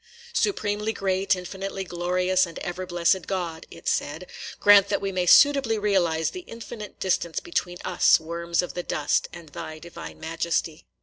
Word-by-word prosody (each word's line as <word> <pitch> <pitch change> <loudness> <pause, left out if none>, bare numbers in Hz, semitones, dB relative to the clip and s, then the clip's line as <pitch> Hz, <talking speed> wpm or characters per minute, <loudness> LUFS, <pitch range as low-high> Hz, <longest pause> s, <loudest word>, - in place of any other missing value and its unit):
"Supremely 210 - 0
great, 195 -1 +1
infinitely 190 +1 -5
glorious, 180 +1 +1
and 165 - -10
ever 180 +1 -5
blessed 175 +1 +1
God," 175 -4 -3
it 165 - -12
said, 155 +5 -1 0.3
"grant 200 -1 +7
that 200 - +1
we 195 0 -2
may 180 -1 -1
suitably 275 0 +6
realize 175 -6 +1
the 365 - -7
infinite 230 -2 -9
distance 175 -3 0
between 175 +1 -3
us, 180 - +4
worms 170 +2 -1
of 180 - -6
the 180 - -3
dust, 150 -4 0
and 170 -3 -11
thy 155 +2 -7
divine 170 +2 -10
majesty." 165 0 -2
180 Hz, 160 wpm, -25 LUFS, 170-195 Hz, 0.3 s, grant